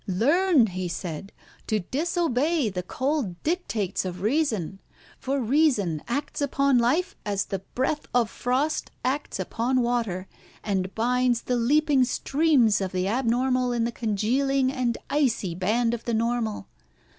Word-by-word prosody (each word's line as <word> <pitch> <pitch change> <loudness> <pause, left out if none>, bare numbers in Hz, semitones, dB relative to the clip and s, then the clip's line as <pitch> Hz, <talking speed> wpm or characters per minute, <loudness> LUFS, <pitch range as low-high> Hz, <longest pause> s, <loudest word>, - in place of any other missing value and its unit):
"Learn," 290 - +3
he 185 -3 -3
said, 170 +2 -5 0.4
"to 215 -2 +1
disobey 310 - 0
the 185 -2 -3
cold 255 - -2
dictates 265 - -1
of 180 0 -5
reason; 220 - 0 0.4
for 275 +1 -1
reason 235 - +2
acts 285 +4 -3
upon 275 -2 +2
life 285 +11 +1
as 200 -1 -1
the 195 - -3 0.2
breath 275 +4 -1
of 240 -2 +3
frost 260 +8 -1 0.2
acts 270 -2 -2
upon 240 +7 0
water, 225 -6 -1 0.4
and 190 -2 -2
binds 245 +1 +1
the 250 - 0
leaping 280 +3 +3
streams 255 -4 +2
of 190 -1 -3
the 185 0 0
abnormal 250 +2 +1
in 240 -1 0
the 235 - -1
congealing 255 +5 +1
and 250 -3 -1
icy 250 - +1
band 225 +7 +1
of 235 - -5
the 235 - 0
normal. 230 -1 -1
240 Hz, 140 wpm, -25 LUFS, 205-275 Hz, 0.4 s, Learn